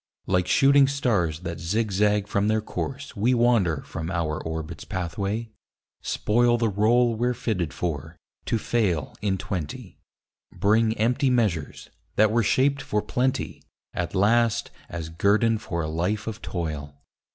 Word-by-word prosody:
Like 90 -1 +1
shooting 140 +4 +5
stars 100 - 0
that 85 -2 -5
zig 105 +6 -1
zag 105 +1 +2
from 100 +1 +1
their 110 0 +2
course 140 +5 -5
We 115 +5 +2
wander 115 - +2
from 80 0 -5
our 80 -4 -1
orbit's 80 -1 -5
pathway; 100 +5 -3 0.5
spoil 120 +2 +2
The 115 -2 +1
rôle 115 +4 +3
we're 120 +2 0
fitted 90 -10 -2
for, 80 -1 -4 0.3
to 115 - +1
fail 100 - 0
in 100 -2 0
twenty. 90 -5 -5 0.5
Bring 110 +2 +2
empty 125 +5 +2
measures, 105 - -1 0.2
that 110 0 +4
were 120 +1 +3
shaped 135 +6 +2
for 105 0 -1
plenty, 130 +1 -1 0.3
At 85 +3 -3
last 115 +3 +2 0.2
as 80 -2 -5
guerdon 105 +6 +2
for 85 -6 -3
a - - -2
life 90 +7 -1
of 110 -2 -5
toil. 75 -5 -5
105 Hz, 145 wpm, -25 LUFS, 85-115 Hz, 0.5 s, shooting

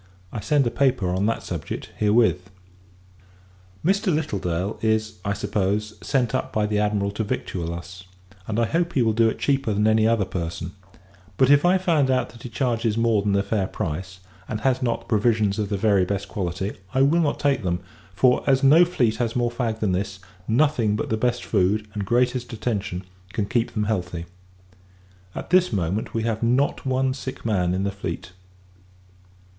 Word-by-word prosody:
I - - -4
send 145 +4 +2
a 120 - 0
paper 130 -9 +1
on 95 +3 +1
that 115 - -1
subject, - - -5
herewith. 105 -4 +2 1.4
Mr. 195 +2 +2
Littledale 100 - -2
is, 110 -2 0
I 100 - 0
suppose, 105 +2 -1
sent 130 -5 0
up - - -1
by 105 -1 +1
the 105 0 0
Admiral 105 -1 0
to 105 +2 -2
victual 85 -4 -3
us, 85 +2 -8 0.4
and 110 +1 -1
I 115 - +3
hope 170 +7 0
he 130 - +3
will 110 -1 +2
do 115 +1 +4
it - - -4
cheaper 135 -6 0
than 105 +1 +2
any 110 0 +4
other 115 -3 +2
person: 85 -1 -4 0.7
but, 130 +1 +5
if 145 +3 +5
I 180 +2 +5
find 165 -7 +2
out 130 -1 +1
that 115 - -15
he 125 - -7
charges 115 -2 0
more 115 -3 +3
than 100 0 0
the 100 0 +2
fair 100 -1 -1
price, 95 +4 -5 0.3
and 110 -1 -3
has 130 +1 +1
not 120 -2 0
the - - -19
provisions 110 -2 +1
of 105 -2 -1
the 100 - -1
very 100 -2 +3
best 100 +1 -2
quality, 95 +1 -3 0.2
I 135 - +5
will 160 +5 +4
not 150 -3 0
take 140 -3 +1
them; 90 -3 -1 0.4
for, 125 +4 +3
as 135 0 +3
no 155 +6 +7
fleet 125 -11 0
has 115 -2 -1
more 120 -1 +1
fag 115 -2 -2
than 105 -3 +1
this, 95 +2 -2 0.3
nothing 115 -3 +2
but 110 - -3
the - - +3
best 120 +2 -1
food, 105 +1 +1
and 105 -2 -3
greatest 125 +1 +1
attention, 105 -5 -3 0.3
can 105 -3 0
keep 115 +2 -1
them 105 - +1
healthy. 90 -5 -2 1.1
At - - -6
this 180 0 +4
moment, 95 +2 -2
we 115 - 0
have 110 -1 -1
not 125 +4 +1
one 130 0 +1
sick 130 -2 -7
man 90 -5 +1
in 95 - -1
the 100 - 0
fleet. 95 -3 -6
110 Hz, 190 wpm, -24 LUFS, 100-125 Hz, 1.4 s, no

